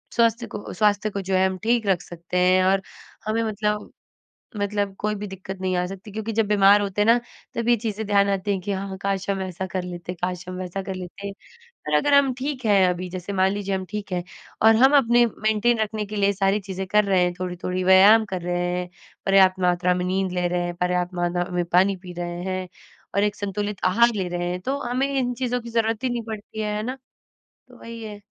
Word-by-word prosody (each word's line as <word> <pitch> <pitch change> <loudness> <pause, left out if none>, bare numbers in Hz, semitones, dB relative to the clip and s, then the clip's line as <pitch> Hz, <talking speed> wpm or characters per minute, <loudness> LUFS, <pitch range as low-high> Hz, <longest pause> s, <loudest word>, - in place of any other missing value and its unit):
स्वास्थ 230 0 +2
को 205 - -7
स्वास्थ्य 210 0 +2
को 200 - -3
जो 190 0 -1
है 185 0 +4
हम 190 0 -3
ठीक 230 -2 +1
रख 185 -3 +2
सकते 175 +1 -6
हैं 185 +1 +4
और 190 +1 +3 0.4
हमें 225 +1 0
मतलब, 210 -1 -2 0.7
मतलब 205 -1 -1
कोई 210 0 -1
भी 210 0 -5
दिक्कत 190 0 -8
नहीं 185 -1 -1
आ 180 - +1
सकती 195 +3 -9
क्योंकि 220 +1 -4
जब 225 0 +1
बीमार 205 0 +6
होते 200 0 -2
हैं 210 - +1
ना, 235 +1 +6 0.4
तब 235 0 -2
ये 240 - +6
चीज़ें 220 -1 -4
ध्यान 200 -1 +3
आती 195 +1 -1
हैं 195 -2 0
कि 200 +3 -3
हाँ, 195 0 -4
काश 195 -1 -2
हम 195 -1 -1
ऐसा 185 0 -4
कर 185 - -1
लेते, 180 0 -6
काश 180 +1 -4
हम 185 - -5
वैसा 185 +1 -4
कर 190 0 -5
लेते 185 +2 -7 0.4
और 475 0 -8
अगर 290 0 +2
हम 280 -2 +5
ठीक 265 -2 -4
हैं 195 -3 +5
अभी 180 0 -2
जैसे 185 +2 -6
मान 190 0 +3
लीजिए, 200 -1 -2
हम 190 0 -4
ठीक 210 -1 -5
हैं 175 -1 -1 0.4
और 225 +1 +7
हम 265 +5 +6
अपने 240 -2 +4
मेंटेन 220 +1 +1
रखने 215 -1 -1
के 210 +1 -7
लिए 200 -1 +2
सारी 195 +1 +1
चीज़ें 190 -1 -5
कर 210 +2 +4
रहे 190 -2 +3
हैं। 180 0 0
थोड़ी-थोड़ी 180 0 -3
व्यायाम 195 +4 +7
कर 185 - -2
रहे 175 0 -1
हैं, 180 0 -4 0.4
पर्याप्त 190 -1 +5
मात्रा 180 0 +2
में 180 0 -2
नींद 190 0 0
ले 180 -1 0
रहे 175 0 -1
हैं, 175 0 -4
पर्याप्त 180 0 -1
मात्रा 175 0 0
में 175 - +1
पानी 185 +3 +3
पी 180 -1 -8
रहे 175 0 -4
हैं 185 -1 -3 0.5
और 200 - +3
एक 210 0 0
संतुलित 205 0 -3
आहार 235 +6 +4
ले 190 -3 -1
रहे 175 0 -2
हैं 180 - -3
तो 270 +8 -2
हमें 255 +3 +1
इन 245 -1 0
चीज़ों 250 0 -2
की 235 - -9
ज़रूरत 225 0 0
ही 260 - +1
नहीं 240 -1 -2
पड़ती 220 0 -7
है। 210 -1 -2
है 210 - -2
ना? 255 +3 -4 0.7
तो - - -16
वही 230 0 -8
है, 210 -1 -7
195 Hz, 235 wpm, -24 LUFS, 185-215 Hz, 0.7 s, और